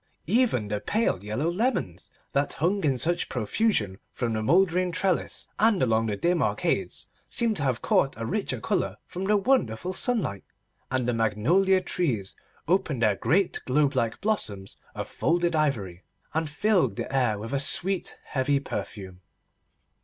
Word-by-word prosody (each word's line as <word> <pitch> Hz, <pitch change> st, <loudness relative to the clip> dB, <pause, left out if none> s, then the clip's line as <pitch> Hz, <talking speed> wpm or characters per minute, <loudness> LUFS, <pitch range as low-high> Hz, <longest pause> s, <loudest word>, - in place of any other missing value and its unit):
Even 205 Hz, -, +2 dB
the 105 Hz, -1 st, -1 dB
pale 205 Hz, -, 0 dB
yellow 110 Hz, +9 st, -2 dB
lemons, 185 Hz, -, -1 dB, 0.2 s
that 140 Hz, +1 st, 0 dB
hung 185 Hz, +5 st, 0 dB
in 135 Hz, -4 st, +2 dB
such 175 Hz, +6 st, 0 dB
profusion 110 Hz, -, 0 dB
from 120 Hz, -2 st, -2 dB
the 110 Hz, -, -1 dB
mouldering 180 Hz, -, +3 dB
trellis 185 Hz, +1 st, -1 dB
and 215 Hz, -6 st, +4 dB
along 115 Hz, -2 st, +2 dB
the 105 Hz, -2 st, -2 dB
dim 170 Hz, -, +1 dB
arcades, -, -, 0 dB, 0.2 s
seemed 230 Hz, -2 st, +2 dB
to -, -, -1 dB
have 130 Hz, -4 st, -1 dB
caught 135 Hz, -, +2 dB
a 115 Hz, -, -4 dB
richer 205 Hz, -, -1 dB
colour 205 Hz, -, -1 dB
from 185 Hz, +2 st, -5 dB
the 210 Hz, +1 st, +3 dB
wonderful 185 Hz, -, +1 dB
sunlight, 195 Hz, -, -1 dB, 0.5 s
and 130 Hz, -2 st, -1 dB
the 125 Hz, -, +1 dB
magnolia 140 Hz, -, +2 dB
trees 130 Hz, -, -2 dB, 0.3 s
opened 165 Hz, -8 st, +1 dB
their 105 Hz, -2 st, +3 dB
great 185 Hz, -, +1 dB
globe 140 Hz, +2 st, +2 dB
like 115 Hz, -4 st, -1 dB
blossoms 105 Hz, -, -2 dB, 0.2 s
of -, -, -4 dB
folded 175 Hz, 0 st, 0 dB
ivory, 110 Hz, -, -1 dB, 0.3 s
and 160 Hz, -1 st, -1 dB
filled 165 Hz, -, +1 dB
the 135 Hz, -, -4 dB
air 120 Hz, -6 st, +2 dB
with 115 Hz, +6 st, -6 dB
a 140 Hz, -, +1 dB
sweet 185 Hz, +6 st, +2 dB
heavy 140 Hz, +1 st, 0 dB
perfume. 95 Hz, -8 st, -6 dB
145 Hz, 155 wpm, -26 LUFS, 115-185 Hz, 0.5 s, and